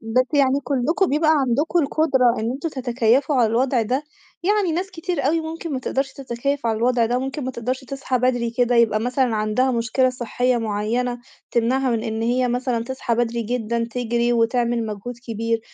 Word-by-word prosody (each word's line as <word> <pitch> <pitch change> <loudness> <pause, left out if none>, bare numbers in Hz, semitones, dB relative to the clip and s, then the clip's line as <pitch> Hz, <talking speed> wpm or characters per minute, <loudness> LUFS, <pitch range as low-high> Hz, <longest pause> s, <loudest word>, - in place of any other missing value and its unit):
بس 225 +3 +1
يعني 275 -1 +3
كلكم 280 +9 +1
بيبقى 310 +2 +3
عندكم 295 +3 +2
القدرة 275 -5 +2
إن 225 +2 -1
أنتم 275 +6 -3
تتكيّفوا 260 0 +1
على 240 -3 +4
الوضع 245 +2 +1
ده؟ 255 +6 -1 0.4
يعني 400 -1 +2
ناس 365 +4 -2
كتير 330 -5 -2
أوي 325 +3 +2
ممكن 320 0 -5
ما 265 - -1
تقدرش 265 +1 -2
تتكيّف 275 +1 -3
على 225 -1 +1
الوضع 240 0 +2
ده، 240 +2 0
وممكن 270 +2 -4
ما 260 - -2
تقدرش 255 +2 -3
تصحى 270 -1 -2
بدري 245 -1 +1
كده، 245 +1 +1
يبقى 225 -2 +3
مثلًا 250 0 +1
عندها 215 +5 +1
مشكلة 250 +2 +1
صحية 250 0 0
معيّنة 230 +3 -1 0.3
تمنعها 255 +3 +1
من 230 -2 0
إن 220 0 -3
هي 250 +2 +1
مثلًا 245 -1 -1
تصحى 260 -2 -2
بدري 235 0 0
جدًا 235 0 -1
تجري، 235 0 0
وتعمل 235 0 +1
مجهود 215 +3 -6
كبير. 230 0 -1
245 Hz, 180 wpm, -22 LUFS, 230-270 Hz, 0.4 s, على